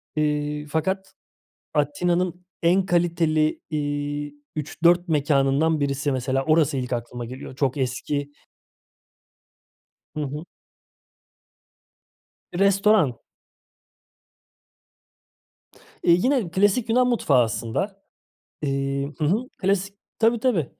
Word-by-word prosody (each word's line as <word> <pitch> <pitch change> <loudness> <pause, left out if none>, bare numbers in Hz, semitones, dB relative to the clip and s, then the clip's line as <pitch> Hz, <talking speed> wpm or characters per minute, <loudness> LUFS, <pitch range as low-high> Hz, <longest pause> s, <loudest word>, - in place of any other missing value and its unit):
Eee, 150 0 -1
fakat 190 +5 -2 0.6
Atina'nın 175 +4 0 0.2
en 185 +3 +4
kaliteli, 165 -3 +1
iii, 145 -1 -3 0.2
3-4 170 +4 +2
mekânından 145 +1 +2
birisi 140 0 0
mesela 130 +1 0
orası 155 -2 +3
ilk 125 -1 -2
aklıma 120 0 -4
geliyor. 130 +2 -9
Çok 135 0 0
eski 140 +2 -2 1.8
Hı - - -3
hı. 150 +4 -5 2.1
Restoran. 195 - +3 2.9
Eee, 170 - +6
yine 235 +2 +2
klasik 205 +6 +2
Yunan 250 +2 +4
mutfağı 140 - +3
aslında. 190 - -3 0.6
Eee, 140 0 -1
hı 155 - 0
hı, 215 - +1
klasik, 195 0 0 0.2
tabii 230 0 +3
tabii, 215 - +1
155 Hz, 90 wpm, -24 LUFS, 140-185 Hz, 2.9 s, Eee